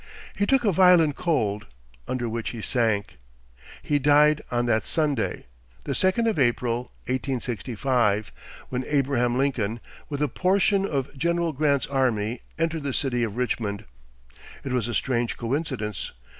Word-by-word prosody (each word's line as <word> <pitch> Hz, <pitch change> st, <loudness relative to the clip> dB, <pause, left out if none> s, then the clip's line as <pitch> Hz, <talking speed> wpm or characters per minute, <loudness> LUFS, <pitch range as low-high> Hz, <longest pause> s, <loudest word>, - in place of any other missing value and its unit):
He 205 Hz, -, 0 dB
took 270 Hz, -3 st, +3 dB
a 205 Hz, -, +4 dB
violent 175 Hz, -5 st, +5 dB
cold, 110 Hz, -, -1 dB, 0.4 s
under 125 Hz, -2 st, -2 dB
which 115 Hz, 0 st, -3 dB
he 115 Hz, -3 st, -7 dB
sank. 110 Hz, -, 0 dB, 0.7 s
He 145 Hz, -1 st, +1 dB
died 150 Hz, +2 st, +5 dB
on 120 Hz, 0 st, 0 dB
that 110 Hz, -2 st, +1 dB
Sunday, 145 Hz, -7 st, 0 dB, 0.4 s
the -, -, -2 dB
second 190 Hz, +5 st, +2 dB
of 220 Hz, -7 st, +1 dB
April, 120 Hz, -1 st, +1 dB, 0.2 s
1865, 125 Hz, -4 st, -1 dB, 0.4 s
when 125 Hz, 0 st, -2 dB
Abraham 130 Hz, -4 st, +1 dB
Lincoln, 120 Hz, -5 st, 0 dB, 0.3 s
with 145 Hz, 0 st, -2 dB
a -, -, +2 dB
portion 195 Hz, -, +2 dB
of 140 Hz, -3 st, -3 dB
General 170 Hz, +3 st, 0 dB
Grant's 140 Hz, -1 st, +1 dB
army, 120 Hz, -4 st, 0 dB, 0.2 s
entered 165 Hz, 0 st, -1 dB
the 140 Hz, -2 st, -3 dB
city 125 Hz, -3 st, 0 dB
of 115 Hz, -1 st, -2 dB
Richmond. 110 Hz, -5 st, -2 dB, 0.8 s
It 135 Hz, -, -4 dB
was 125 Hz, -3 st, 0 dB
a 120 Hz, -, -3 dB
strange 120 Hz, -3 st, 0 dB
coincidence. 120 Hz, -, -3 dB
130 Hz, 145 wpm, -25 LUFS, 120-150 Hz, 0.8 s, violent